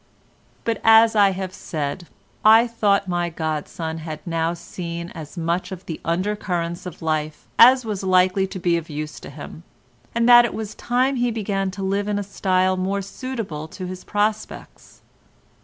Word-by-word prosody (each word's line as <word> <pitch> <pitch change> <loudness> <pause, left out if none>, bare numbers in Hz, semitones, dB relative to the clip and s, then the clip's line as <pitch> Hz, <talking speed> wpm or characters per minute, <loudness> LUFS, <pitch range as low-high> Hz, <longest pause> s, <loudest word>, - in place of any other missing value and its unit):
But, 230 -2 -2
as 225 0 +6
I 200 -2 +6
have 190 -1 -4
said, 155 +2 -4 0.4
I 225 +2 +7
thought 205 -4 +1
my 175 -1 -1
godson 160 0 -4
had 155 -1 -6
now 165 0 -1
seen 170 0 -6
as 155 +1 -10
much 170 +3 -1
of 185 0 -8
the 160 - -6
under 185 +5 0
currents 175 -3 -3
of 170 - -9
life 155 -1 -2
as 250 +1 +8
was 210 -3 -3
likely 185 +1 +3
to 190 - -7
be 175 -1 +1
of 165 -1 -6
use 150 0 -5
to - - -10
him, 150 +2 -10 0.5
and 235 0 +2
that 240 0 +9
it 240 - -2
was 220 -1 -5
time 255 +3 0
he 245 0 +1
began 200 -4 -2
to 195 - -4
live 200 +1 -1
in 205 -1 0
a 205 - -2
style 185 -1 +1
more 195 +2 -1
suitable 200 - -5
to 185 +3 -8
his 185 0 -7
prospects. 210 +1 -3
185 Hz, 175 wpm, -22 LUFS, 170-210 Hz, 0.5 s, that